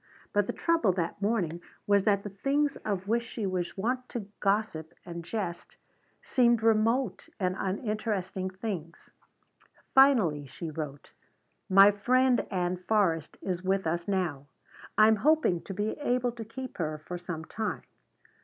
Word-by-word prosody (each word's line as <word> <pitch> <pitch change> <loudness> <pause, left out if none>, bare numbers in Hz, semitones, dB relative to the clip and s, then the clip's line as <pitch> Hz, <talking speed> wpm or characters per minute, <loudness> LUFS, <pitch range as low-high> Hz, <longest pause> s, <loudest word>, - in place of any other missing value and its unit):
But 205 -1 +2
the - - -2
trouble 335 - +2
that 175 +2 -3
morning 190 -6 0 0.2
was 200 -1 +3
that 200 -2 +3
the 205 - -6
things 280 +8 0
of 195 -2 -3
which 230 +2 +2
she 230 -2 -5
was 185 -2 -2
wont 250 +5 -1
to 230 -5 -4
gossip 195 -6 0
and 170 -1 -6
jest 175 -1 -5 0.5
seemed 235 -3 +3
remote 225 +1 +2
and 185 -1 0
uninteresting 200 -2 -2
things. 185 -4 -6 0.8
Finally 215 - +5
she 160 +5 -6
wrote: 145 -2 -6 0.6
"My 195 +2 +8
friend 250 +5 +2
Ann 180 -2 -1
Forrest 180 -4 0
is 180 -2 -2
with 190 0 0
us 170 +1 -1
now. 175 -8 -1 0.5
I 215 - +8
am 220 0 +4
hoping 290 - +3
to - - -6
be 210 +2 -1
able 250 -3 +1
to 230 -1 -8
keep 255 +2 -8
her 155 -2 -1
for 175 +3 -7
some 170 -2 -6
time. 220 +4 -3
200 Hz, 150 wpm, -29 LUFS, 175-230 Hz, 0.8 s, My